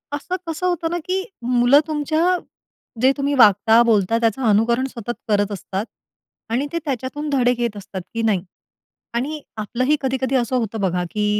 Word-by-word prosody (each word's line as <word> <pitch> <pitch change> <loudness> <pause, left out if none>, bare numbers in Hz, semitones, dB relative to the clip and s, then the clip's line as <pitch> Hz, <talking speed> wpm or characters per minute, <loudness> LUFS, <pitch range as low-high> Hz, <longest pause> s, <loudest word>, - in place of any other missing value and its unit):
असं 360 +5 -4
कसं 325 +3 -3
होतं 335 -2 -1
ना, - - 0
की 370 - 0 0.4
मुलं 245 +4 +6
तुमच्या 310 +1 0 0.8
जे 260 +1 +6
तुम्ही 280 +1 0
वागता, 220 +2 +6
बोलता 215 +1 +3
त्याचं 230 +4 +1
अनुकरण 235 +5 +3
सतत 240 +1 -4
करत 205 -1 +1
असतात. 195 +1 -4 0.7
आणि 260 +5 +1
ते 335 - -2
त्याच्यातून 275 +3 -3
धडे 250 -3 +3
घेत 235 -3 -1
असतात 190 -1 -7
की 230 - -2
नाही 190 -4 +1 0.8
आणि 295 +4 -3 0.2
आपलंही 255 +8 +1
कधी, 265 0 0
कधी 260 +1 0
असं 250 0 +1
होतं 225 -2 -1
बघा 180 -2 0
की 210 -1 -1
245 Hz, 170 wpm, -21 LUFS, 215-285 Hz, 0.8 s, मुलं